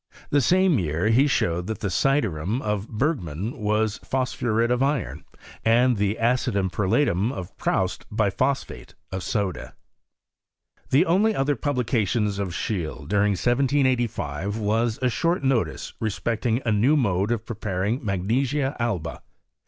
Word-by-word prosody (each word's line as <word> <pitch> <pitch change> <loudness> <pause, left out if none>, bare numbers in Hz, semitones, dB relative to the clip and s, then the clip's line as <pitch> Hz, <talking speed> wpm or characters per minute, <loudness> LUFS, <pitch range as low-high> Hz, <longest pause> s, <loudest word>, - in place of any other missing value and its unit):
The 145 - +4
same 185 - +3
year 85 +3 0
he 130 +6 +4
showed 90 - 0
that 110 - -4
the 100 - -1
syderum 105 - +1
of 105 0 -2
Bergman 110 - -2
was 105 0 0
phosphuret 120 -3 0
of 125 +1 +1
iron, 140 -3 -1 0.4
and 120 +2 +4
the 100 +1 0
acidum 115 -5 +1
perlatum 105 0 +1
of 90 -10 -7
Proust - - -1
biphosphate 110 +6 -1 0.2
of 95 0 -3
soda. 100 -1 -3 1.1
The 145 +7 +4
only 205 +6 +3
other 140 +2 +1
publication 120 -6 0
of 100 -2 -2
Scheele, 85 -6 -3
during 105 +2 +2
1785, 120 - 0
was 110 +2 0
a - - +4
short 170 +4 0
notice 135 -4 0
respecting 115 +2 -1
a 115 - +2
new 120 +9 +3
mode 100 -4 +1
of 115 -2 -1
preparing 105 +3 -2
magnesia 125 +8 0
alba. 90 - -2
110 Hz, 130 wpm, -24 LUFS, 100-130 Hz, 1.1 s, The